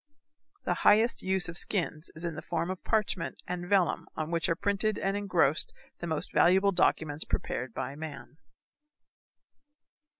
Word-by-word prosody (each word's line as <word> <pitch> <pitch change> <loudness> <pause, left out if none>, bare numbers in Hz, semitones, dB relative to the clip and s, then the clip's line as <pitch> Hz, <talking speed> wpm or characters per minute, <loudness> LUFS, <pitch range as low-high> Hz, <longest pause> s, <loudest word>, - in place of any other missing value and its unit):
The - - +1
highest 220 +3 +5
use 190 -1 +1
of 170 0 -2
skins 170 -4 -2
is 165 +2 -5
in 170 - -2
the - - -6
form 170 +3 -2
of 185 - -7
parchment 220 -2 -1
and 175 0 -4
vellum 190 -4 +2
on 155 +1 -3
which 165 -1 0
are 165 - +2
printed 200 +3 +1
and 195 +1 -1
engrossed 180 -6 +1 0.2
the 175 - -4
most 160 -2 -3
valuable 190 +3 +5
documents 160 -5 +1
prepared 125 -1 -3
by 130 +3 -4
man. 155 0 -8
175 Hz, 155 wpm, -29 LUFS, 160-195 Hz, 0.2 s, highest